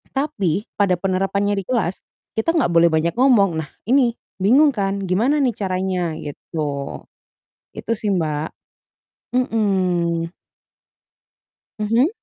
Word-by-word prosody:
tapi 205 - -1
pada 195 -3 +3
penerapannya 195 +2 0
di - - -5
kelas, 220 -8 0 0.4
kita 220 +9 +1
enggak 255 - +2
boleh 170 0 +5
banyak 160 +2 +1
ngomong, 220 -10 +4
nah, 150 - -13 0.2
ini 250 -2 +3 0.3
bingung 280 +9 +6
kan 200 -1 -1
gimana 235 +12 +2
nih 250 -6 +1
caranya, 185 -4 -1
gitu. 145 -1 -5 0.7
Itu, - - -5
sih, 210 -1 -2
Mbak, 155 -2 -1 0.9
mhm. 185 -8 +1 1.5
Mhm. 230 +7 +3
195 Hz, 115 wpm, -21 LUFS, 170-230 Hz, 1.5 s, bingung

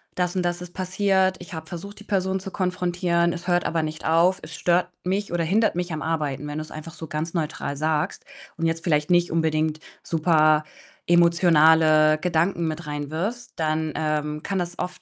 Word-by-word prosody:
das 180 0 -1
und 185 - +1
das 175 0 -1
ist 175 0 -9
passiert. 190 0 +1
Ich 180 0 -11
habe 160 0 -6
versucht, 200 +5 -8
die 210 - -11
Person 190 -2 -1
zu 195 0 -7
konfrontieren, 175 -2 0
es 175 +1 -7
hört 175 -1 +2
aber 165 -1 0
nicht 155 0 -5
auf. 170 +4 +3
Es 165 - -8
stört 175 +2 +1 0.2
mich 195 +1 -1
oder 170 -1 0
hindert 210 +4 +2
mich 175 -1 -2
am 155 - -4
Arbeiten.“ 150 -3 -2
Wenn 150 +1 -5
du's 155 0 -6
einfach 155 +1 -8
so 160 -1 -8
ganz 155 +2 -4
neutral 150 -4 -3
sagst 155 0 -1 0.3
und 165 - -1
jetzt 165 0 -1
vielleicht 150 -2 +1
nicht 175 -1 +3
unbedingt 155 -1 0 0.2
super 155 -2 +3 0.4
emotionale 160 -3 +5
Gedanken 170 0 0
mit 160 +1 -4
reinwirfst, 160 +12 -4
dann, 155 -1 -1
ähm, 150 0 -2
kann 195 -2 -2
das 175 0 -4
oft 180 - -5
170 Hz, 190 wpm, -24 LUFS, 155-180 Hz, 0.4 s, emotionale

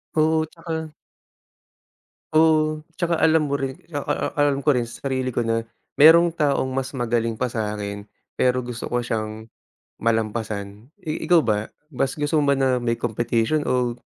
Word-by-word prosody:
Oo, 160 0 +3
tsaka 160 -2 -5 1.4
Oo, 155 -1 +4 0.2
tsaka 170 -2 0
alam 160 -1 +4
mo 140 - 0
rin 135 -1 -3 0.2
a 145 - -2
a - - +2 0.3
alam 140 -1 +2
ko 150 - +4
rin 125 -3 0
sa 120 - -12
sarili 130 -2 -2
ko 120 - +1
na 115 0 -1 0.3
merong 165 +3 +8
taong 145 -5 0
mas 130 +1 -3
magaling 115 -2 0
pa 125 +1 -2
sa'kin 105 -2 -4 0.3
pero 125 0 +2
gusto 120 -1 -6
ko 120 0 -1
siyang 110 -1 -4 0.5
malampasan. 110 0 -2
I 160 -5 -4
ikaw 175 -2 +5
ba 110 -6 -1 0.2
mas 135 -1 -2
gusto 145 +2 0
mo 140 - +3
ba 140 - +1
na 130 -2 +1
may 115 -1 0
competition 120 +5 0
o 125 -3 0
130 Hz, 160 wpm, -23 LUFS, 115-155 Hz, 1.4 s, merong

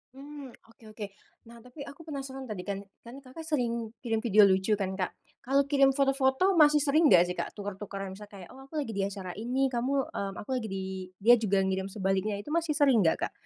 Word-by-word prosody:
Mmm, 280 -2 -10 0.2
oke 225 - -24
oke. 215 -1 -5 0.4
Nah, 235 0 -13
tapi 250 +5 -11
aku 285 +3 -11
penasaran, 270 -3 -6
tadi 205 -5 -5
kan 200 0 -4 0.2
kan 240 +4 -10
Kakak 270 +4 -11
sering 235 -8 -2
kirim 225 -2 -2
video 210 -2 +6
lucu 190 +2 +1
kan, 190 -1 -2
Kak, 185 -2 -2 0.3
kalau 275 +2 +3
kirim 275 -1 +4
foto-foto 270 +6 +2
masih 300 -2 +6
sering 295 +1 +3
nggak 175 -1 +8
sih, 180 - -4
Kak, 170 - -4
tuker-tukeran? 195 -1 -6
Misalnya 210 0 -12
kayak, - - -13
oh 265 - -13
aku 300 +3 -5
lagi 270 -6 -3
di 195 - 0
acara 195 -2 -4
ini, 255 +5 0
kamu, 260 +2 -1
mmm, 195 -1 -4
aku - - -10
lagi 220 - -5
di 190 0 -3 0.4
dia 235 +4 +7
juga 205 -4 +1
ngirim 190 0 -1
sebaliknya, 195 +1 -1
itu 250 +9 -8
masih 335 -1 +1
sering 280 -7 +4
nggak, 160 - +3
Kak? - - -22
235 Hz, 215 wpm, -29 LUFS, 200-275 Hz, 0.4 s, nggak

